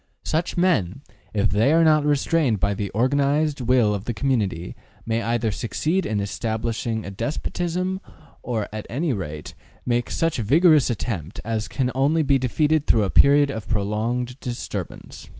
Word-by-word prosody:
Such 165 +3 -1
men, 140 - +1 0.3
if 105 -2 +1
they 110 +8 +3
are 165 +1 +5
not 155 -2 +4
restrained 145 -5 +1
by 100 +1 +1
the 100 0 -3
organized 140 +5 +1
will 120 -3 +3
of 100 0 -4
the 120 - -3
community, 100 -8 -1 0.3
may 115 0 0
either 115 -1 0
succeed 155 - -1
in 105 - -1
establishing 110 +2 -3
a 100 - -6
despotism, 175 - -3 0.4
or, 115 -4 -2
at 110 -1 -6
any 145 +4 -1
rate, 75 -7 -6 0.3
make 120 -1 0
such 165 -5 0
a - - -1
vigorous 155 - +5
attempt 100 -7 -4
as 110 -1 -2
can 130 -1 -1
only 145 +5 +2
be 140 -1 +3
defeated 150 +4 +1
through 110 -2 +4
a 95 - -1
period 140 0 +5
of 110 -5 -7
prolonged 115 +4 -2
disturbance. 120 -3 -6
120 Hz, 160 wpm, -23 LUFS, 110-145 Hz, 0.4 s, are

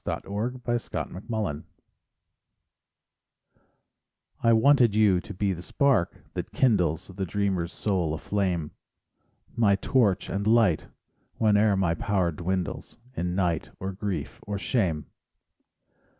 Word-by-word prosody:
SONGS - - -4 0.4
AND 120 -5 -3
DREAMS - - -20
Regret 100 -10 -2 2.8
I 115 - +4
wanted 120 -1 +5
you 105 -4 +4
to - - -10
be 95 +1 0
the 85 - -7
spark, 125 -1 +1
that - - -5
kindles 90 - +1
The 95 +1 -4
dreamer's 95 -2 -1
soul 90 -8 -1
aflame, 90 -3 -1 0.8
My 105 -4 +4
torch 105 -4 +1
and 100 +2 -2
light 110 -8 +3 0.5
whene'er 105 -2 +3
my 90 -3 +2
power 90 -1 0
dwindles 90 +2 -3 0.2
In 90 +1 -2
night, 85 -4 0
or 95 +1 -3
grief, 95 - -4
or 100 -1 -2
shame. 90 - 0
95 Hz, 115 wpm, -27 LUFS, 90-110 Hz, 2.8 s, wanted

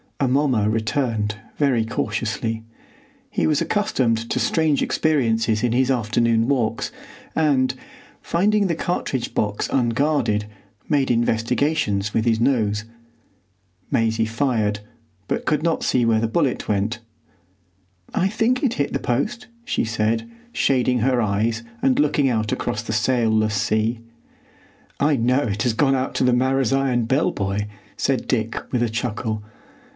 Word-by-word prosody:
Amomma 130 -5 +2
returned 110 -1 -1 0.2
very 135 -6 +2
cautiously. 115 0 -2 0.7
He - - 0
was 150 -2 +2
accustomed 115 - 0
to - - 0
strange 160 -3 +2
experiences 115 -8 +1
in 120 -1 +1
his 130 +1 +2
afternoon 115 -1 +1
walks, 120 -5 0 0.4
and, 135 -5 +2 0.5
finding 205 +4 +1
the 170 -3 0
cartridge 145 -7 -2
box 105 -1 0
unguarded, 120 -3 +1 0.4
made 140 -3 +2
investigations 115 -1 0
with 110 - +1
his 115 -2 +2
nose. 110 -4 +1 1.1
Maisie 115 0 +1
fired, 110 -3 0 0.5
but - - -2
could 150 0 +1
not 165 -1 0
see 125 - +2
where 115 -1 +3
the 115 - +1
bullet 135 +2 0
went. 105 +3 0 1.1
"I 185 - +2
think 230 +6 0
it 250 -4 +1
hit 140 - -1
the - - 0
post," 215 - -2 0.2
she - - 0
said, 110 - -1 0.2
shading 125 - +2
her 125 +1 +2
eyes 110 +2 0 0.2
and 260 +1 +2
looking 145 - +2
out 110 -3 0
across 110 - -2
the 110 - -4
sailless 110 -2 +2
sea. 110 +3 0 1.0
"I 145 +1 +3
know 125 +2 +2
it 105 0 -1
has 120 - +1
gone 135 +3 +3
out 130 0 -2
to - - +1
the 125 -1 +3
Marazion 130 -1 +1
Bell 145 +8 +2
buoy," 100 - -2 0.3
said 130 -3 0
Dick, 115 -2 -1
with 125 - 0
a 120 - +1
chuckle. 110 -2 -3
120 Hz, 140 wpm, -22 LUFS, 110-140 Hz, 1.1 s, where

